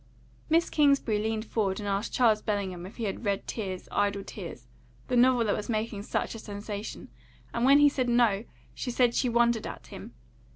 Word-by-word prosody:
Miss 330 +2 +3
Kingsbury 280 -8 +3
leaned 220 +1 -2
forward 200 -4 -1
and 205 - -5
asked 200 +2 -1
Charles 220 -4 +3
Bellingham 190 -4 -3
if 195 - -14
he 235 - -4
had 205 +2 -3
read 200 -2 -1
Tears, 190 -5 -5
Idle 200 -1 0
Tears, 170 - -9 0.4
the - - +1
novel 245 -1 +5
that 205 - +1
was 210 - -5
making 215 -2 -2
such 205 - -2
a 225 - -7
sensation; 205 0 -6 0.4
and 235 +1 +1
when 275 +2 +7
he 290 0 +7
said 260 -3 0
no, 235 -3 +3 0.3
she 255 - -5
said 245 -1 +2
she 250 - +1
wondered 235 -1 +2
at - - -8
him. - - -10
220 Hz, 195 wpm, -28 LUFS, 200-240 Hz, 0.4 s, when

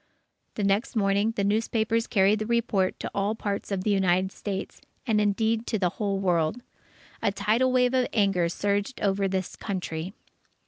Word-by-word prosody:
The 210 - -2
next 200 +6 +1
morning, 200 +1 +2
the 200 - 0
newspapers 225 +2 +1
carried 205 0 +3
the 215 - -3
report 225 -5 +1
to - - -4
all 200 +2 0
parts 205 -1 -4
of 190 -2 -1
the 210 - +1
United 190 -1 +2
States, 195 -2 -5 0.2
and, 220 -4 +2
indeed, 220 +2 +1
to 220 - 0
the 185 -3 +1
whole 200 +2 -2
world. 180 +3 0 0.6
A 215 - +2
tidal 230 +6 +1
wave 250 0 +3
of 255 -1 +2
anger 195 -5 +2
surged 205 +7 -1
over 195 -1 +1
this 190 -1 -3
Country. 185 -2 -4
205 Hz, 170 wpm, -26 LUFS, 195-220 Hz, 0.6 s, carried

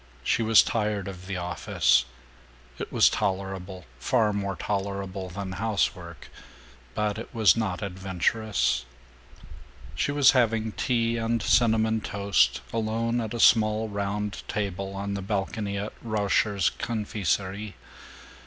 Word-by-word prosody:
She - - +1
was 110 0 +6
tired 105 -3 -1
of 95 -1 -8
the 100 -1 -3
office. 85 -7 +2 0.7
It - - -5
was - - +5
tolerable, 95 -1 -2
far 110 - +2
more 100 -1 -2
tolerable 100 -1 -3
than 95 +1 -5
housework, 105 +1 -2 0.7
but 105 0 -1
it 115 - -8
was 110 -6 +5
not 105 -4 -2
adventurous. 95 - -1 1.1
She - - -1
was 145 -2 +6
having 115 -3 +1
tea 115 0 0
and 115 0 0
cinnamon 110 -1 +3
toast, 100 -13 +1
alone 115 +1 0
at 110 +1 -4
a - - -4
small 110 -1 +4
round 100 0 -3
table 100 -2 -3
on 100 +1 -3
the 100 - -3
balcony 100 +1 -2
of 105 +2 -4
Rauscher's 100 -5 +1
Confiserie. 100 -2 -2
100 Hz, 125 wpm, -26 LUFS, 95-110 Hz, 1.1 s, was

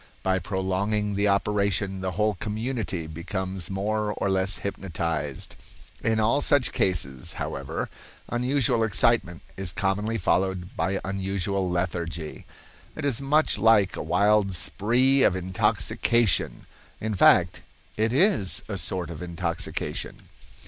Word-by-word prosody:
By 95 0 +1
prolonging 100 +2 -1
the 100 +1 +1
operation, 100 -1 0
a 95 - 0
whole 105 +3 +1
community 110 -3 -3
becomes 95 +3 -5
more 105 +2 -1
or 100 - -1
less 95 +1 +1
hypnotized. 85 -7 -4 0.5
In 110 0 +1
all 115 +7 +3
such 140 -3 +3
cases, 65 -9 0
however, - - -4 0.4
unusual 125 -1 +1
excitement 110 -5 +2
is 95 -2 -2
commonly 105 +5 -1
followed 95 -1 0
by 95 +1 -1
unusual 95 0 -2
lethargy. 85 -3 -3 0.5
It - - -4
is 140 -3 +1
much 145 -4 +2
like 105 -3 +4
a - - -4
wild 100 +4 +2
spree 125 - +2
of 90 - +4
intoxication—in 95 - 0
fact, 95 - +4 0.3
it 110 +1 +1
is 135 - +2
a 100 -3 -4
sort 90 -1 -2
of 85 - -8
intoxication. 85 -1 -4
100 Hz, 120 wpm, -26 LUFS, 90-110 Hz, 0.5 s, like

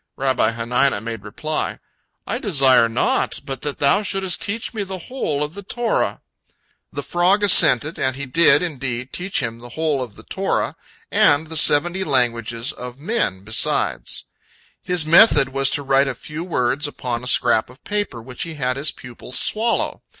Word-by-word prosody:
Rabbi 130 -4 +1
Hanina 125 +2 0
made 115 0 -6
reply, 155 +9 -3 0.5
"I - - -3
desire 135 - +3
naught 115 - 0
but 135 -1 -6
that 145 -1 -4
thou 140 +9 +2
shouldst 195 -3 0
teach 225 +3 -3
me 220 - -4
the 190 -1 -5
whole 165 - -3
of 150 +1 -5
the 200 - -8
Torah." 230 +4 -2 0.7
The - - -5
frog 185 +4 +2
assented, 155 -6 +5
and 130 0 0
he 140 +1 -5
did, 165 +7 +4
indeed, 130 -6 -4
teach 180 -5 -1
him 115 0 -4
the 120 +1 -10
whole 150 +1 -1
of 120 -5 -7
the - - -13
Torah, - - -2 0.4
and 145 +2 +3
the 160 +1 -7
seventy 170 +5 +4
languages 120 -4 0
of 125 0 -9
men 145 - -2
besides. 110 +2 0 0.6
His 180 -4 -1
method 155 - +6
was 135 0 +1
to 145 - +1
write 135 0 +2
a 135 - -3
few 155 +6 -7
words 145 -3 -1
upon 125 -4 -5
a - - -5
scrap 120 -3 +2
of 125 +2 -17
paper, 205 - -3
which 125 0 -9
he 165 -1 -4
had 130 -2 -2
his 140 +1 0
pupil 125 0 -12
swallow. 220 - -1
140 Hz, 170 wpm, -20 LUFS, 125-175 Hz, 0.7 s, method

